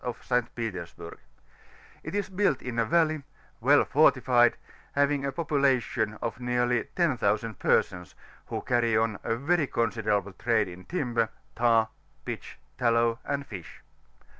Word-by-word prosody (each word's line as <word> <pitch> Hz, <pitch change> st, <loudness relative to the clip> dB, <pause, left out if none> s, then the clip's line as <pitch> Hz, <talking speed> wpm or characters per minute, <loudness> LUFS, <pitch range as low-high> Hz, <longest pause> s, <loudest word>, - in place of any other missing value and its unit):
of 125 Hz, -1 st, -5 dB
St. 125 Hz, -1 st, 0 dB
Petersburg; 90 Hz, -7 st, -6 dB, 0.8 s
it -, -, -6 dB
is 205 Hz, -1 st, -1 dB
built 190 Hz, -7 st, 0 dB
in 120 Hz, -2 st, -3 dB
a 115 Hz, -, +3 dB
valley, 160 Hz, +4 st, +3 dB
and 155 Hz, -3 st, -7 dB, 0.4 s
well -, -, +5 dB
fortified, 120 Hz, -2 st, +4 dB, 0.4 s
having 140 Hz, 0 st, +2 dB
a 140 Hz, -, -1 dB
population 135 Hz, -8 st, 0 dB
of 115 Hz, +1 st, -3 dB
nearly 125 Hz, -1 st, +1 dB
10,000 115 Hz, -, 0 dB
p^sons, 90 Hz, -1 st, +1 dB, 0.3 s
who -, -, -4 dB
carry 120 Hz, -3 st, +2 dB
on 110 Hz, -2 st, 0 dB
a 115 Hz, -, 0 dB
very 150 Hz, +4 st, +1 dB
consaderaUe 105 Hz, -5 st, -1 dB
trade 115 Hz, -4 st, +2 dB
in 90 Hz, +1 st, -11 dB
limber, 120 Hz, -10 st, 0 dB, 0.3 s
tar, 115 Hz, -2 st, +3 dB, 0.4 s
]fitch, -, -, -6 dB, 0.2 s
tallow, 115 Hz, -1 st, +2 dB
and 140 Hz, 0 st, -3 dB
fish. 95 Hz, -9 st, -10 dB
120 Hz, 140 wpm, -28 LUFS, 110-140 Hz, 0.8 s, well